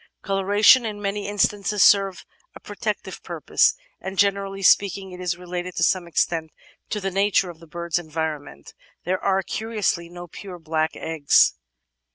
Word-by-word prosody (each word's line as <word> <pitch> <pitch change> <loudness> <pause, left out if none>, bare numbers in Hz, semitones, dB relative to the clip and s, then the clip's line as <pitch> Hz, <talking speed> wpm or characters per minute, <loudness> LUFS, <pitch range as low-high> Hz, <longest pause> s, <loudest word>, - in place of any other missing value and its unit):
Coloration 205 +5 +4
in 215 -2 -4
many 200 0 -3
instances 205 0 +1
serves 195 -2 +4 0.3
a - - -10
protective - - -5
purpose, - - +1 0.2
and, 190 0 -7
generally 195 0 0
speaking, 195 0 +3
it 180 - -10
is 175 -1 -2
related 180 0 -6
to 170 - 0
some 180 -1 +2
extent 165 -1 0 0.4
to 210 - -2
the 195 -1 -3
nature 195 -1 +1
of 165 - -17
the 165 - -15
bird's 170 +1 -2
environment. 155 - -5 0.3
There 185 +1 -1
are, 195 -1 +1
curiously, 210 -7 -2
no 175 0 -9
pure 180 +2 -10
black 160 -1 -2
eggs. 160 -3 +3
185 Hz, 155 wpm, -23 LUFS, 170-200 Hz, 0.4 s, Coloration